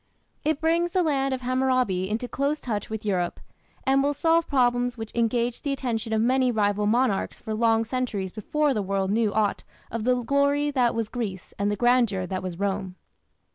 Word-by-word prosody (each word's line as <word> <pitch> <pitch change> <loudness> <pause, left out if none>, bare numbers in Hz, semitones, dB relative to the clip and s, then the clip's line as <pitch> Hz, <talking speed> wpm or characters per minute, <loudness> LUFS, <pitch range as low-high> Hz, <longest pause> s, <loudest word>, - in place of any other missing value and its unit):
It 310 0 0
brings 335 +2 +2
the 365 +1 +1
land 275 -4 +1
of 260 -1 -2
Hammurabi 255 -7 +1
into 225 +4 -2
close 280 +4 -1
touch 210 -5 -3
with 220 -1 -5
Europe, 180 -4 -1 0.5
and 270 +1 +4
will 285 +1 +1
solve 330 +1 +2
problems 245 -2 +1
which 225 -1 -7
engaged 235 +1 0
the 280 - 0
attention 235 -4 -3
of 220 0 +2
many 255 +1 +3
rival 205 -2 +1
monarchs 230 -2 +1
for 220 - -5
long 225 0 +2
centuries 220 -6 -2
before 295 - 0
the 215 - -1
world 195 0 -1
knew 220 -1 +2
aught 210 -1 0 0.3
of 230 -1 -3
"the 250 +1 +1
glory 280 +3 +2
that 250 -4 +2
was 230 -2 -1
Greece 210 -6 -5
and 200 0 +1
the 205 - 0
grandeur 235 -4 +2
that 185 0 -3
was 180 -2 -5
Rome". 195 -1 -2
235 Hz, 190 wpm, -25 LUFS, 205-265 Hz, 0.5 s, and